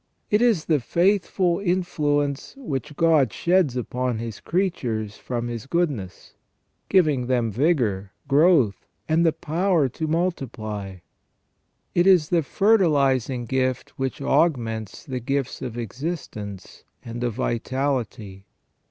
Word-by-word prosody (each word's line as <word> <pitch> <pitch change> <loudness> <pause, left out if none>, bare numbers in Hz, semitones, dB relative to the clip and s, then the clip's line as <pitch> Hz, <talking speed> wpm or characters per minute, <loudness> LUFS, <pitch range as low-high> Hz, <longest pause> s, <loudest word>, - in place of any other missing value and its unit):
It 210 +2 +4
is 225 -10 +3
the 155 -3 +2
fruitful 180 - +1
influence 150 - -1
which 150 - -5
God 155 -8 +3
sheds 170 - +2
upon 125 0 -2
His 115 -2 -6
creatures 120 - -2
from 120 -1 -4
His 120 +1 -6
goodness, 140 - -2 0.6
giving 150 -10 +3
them 120 -3 +1
vigour, 110 - +1 0.2
growth, 145 - +3 0.2
and 160 +1 +3
the 165 - +4
power 165 -1 +1
to 160 +6 -4
multiply. 120 - -3 1.0
It 175 +2 +3
is 180 -6 +5
the 170 -2 +3
fertilizing 140 - +2
gift 130 +1 -1
which 135 +1 -3
augments 120 - 0
the 130 -2 -4
gifts 135 +1 -2
of 120 -2 -5
existence 115 - -6 0.2
and 120 +1 -5
of 120 -3 -1
vitality. 120 -5 -2
135 Hz, 115 wpm, -24 LUFS, 115-170 Hz, 1.0 s, is